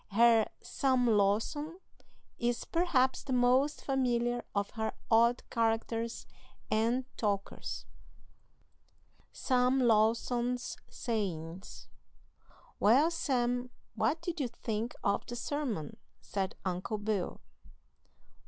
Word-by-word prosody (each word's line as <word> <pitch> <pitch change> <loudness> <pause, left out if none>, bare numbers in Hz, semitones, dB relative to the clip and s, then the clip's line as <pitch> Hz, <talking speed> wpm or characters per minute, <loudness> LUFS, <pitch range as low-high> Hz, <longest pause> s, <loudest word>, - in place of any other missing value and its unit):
Her 230 0 +5 0.2
"Sam 260 -2 +1
Lawson" 225 - +1 0.6
is, 240 0 0
perhaps, 310 -7 +2
the 265 - -3
most 255 +4 +3
familiar 245 -3 +1
of 200 0 0
her 220 -1 -2 0.2
odd 235 +2 +4
characters 230 0 -1 0.5
and 235 +4 +2
talkers. 200 -2 -2 1.5
SAM 255 0 +2
LAWSON'S 240 +2 +2
SAYINGS. 185 -6 -4 0.9
"Well, 270 +11 +5
Sam, 250 -6 0 0.2
what 325 - +1
did 345 -1 -3
you 270 - 0
think 230 -1 -4
of 200 0 +1
the 240 - -5
sermon?" 240 - -3 0.2
said 195 -1 -3
Uncle 185 +4 -2
Bill. 205 -3 -2
235 Hz, 95 wpm, -32 LUFS, 215-255 Hz, 1.5 s, Her